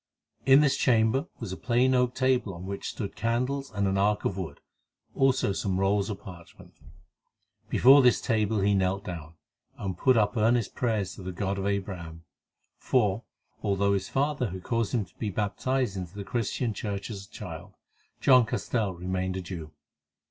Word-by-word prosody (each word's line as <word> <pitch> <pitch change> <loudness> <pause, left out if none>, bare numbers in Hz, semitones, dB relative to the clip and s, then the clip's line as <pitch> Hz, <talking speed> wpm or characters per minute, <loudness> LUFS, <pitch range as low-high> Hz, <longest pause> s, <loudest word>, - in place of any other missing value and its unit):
In 135 +2 +8
this 140 -2 +3
chamber 120 +4 +2
was 115 -6 -5
a - - -3
plain 125 +2 +2
oak 125 -1 +2
table 130 -7 +1
on 85 +2 -8
which 100 +1 -4
stood 100 -4 -5
candles 125 +4 -1
and 100 -1 0
an 95 0 +1
ark 105 +1 +1
of 95 - 0
wood, 95 -4 -6 0.5
also 130 -6 +2
some 95 -1 -1
rolls 100 +1 +1
of 100 - -4
parchment. 85 -3 -13 1.0
Before 135 +3 +7
this 125 -2 +4
table 110 -2 +1
he 100 +1 +3
knelt 95 +1 0
down, 85 -3 -7 0.4
and 95 -2 -4
put 130 +7 +3
up 105 -2 +2
earnest 115 0 +2
prayers 110 -6 -1
to - - -9
the 95 0 -5
God 100 +2 -2
of 95 - -1
Abraham, 90 -5 -4 0.6
for, 110 -3 +1 0.4
although 100 -1 +1
his 95 -1 -2
father 140 -4 0
had 90 0 -7
caused 115 -1 -1
him 110 -4 0
to 85 - -27
be 110 - -2
baptized 105 +4 -1
into 90 -1 -6
the 100 - -5
Christian 120 0 -2
Church 100 +1 -4
as 100 -2 -7
a - - -30
child, - - -9 0.4
John 130 -4 +5
Castell 110 -5 -1
remained 95 +1 -2
a - - -3
Jew. 85 -3 -7
105 Hz, 175 wpm, -28 LUFS, 95-120 Hz, 1.0 s, In